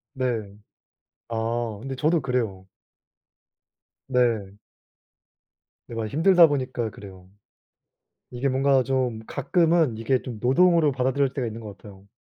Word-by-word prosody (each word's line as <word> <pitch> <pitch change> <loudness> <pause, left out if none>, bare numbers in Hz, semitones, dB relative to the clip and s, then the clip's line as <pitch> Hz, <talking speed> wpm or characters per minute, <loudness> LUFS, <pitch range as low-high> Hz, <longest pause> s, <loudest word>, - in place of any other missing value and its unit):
네. 115 -6 -2 0.7
아 115 -1 -2
근데 135 +2 -6
저도 155 +3 +2
그래요. 115 -8 -2 1.4
네. 120 -7 +1 1.4
네 - - -8
많이 110 -2 -3
힘들다 170 +4 +6
보니까 130 -5 -2
그래요. 95 -3 -13 1.0
이게 125 +2 -2
뭔가 135 0 +2
좀 130 -4 -1
가끔은 165 - +1
이게 125 +3 0
좀 120 -4 -7
노동으로 165 +4 +4
받아들여질 135 +1 0
때가 130 -5 -2
있는 115 +1 -7
것 105 -2 -9
같아요. 100 -1 -15
125 Hz, 245 characters per minute, -24 LUFS, 110-140 Hz, 1.4 s, 힘들다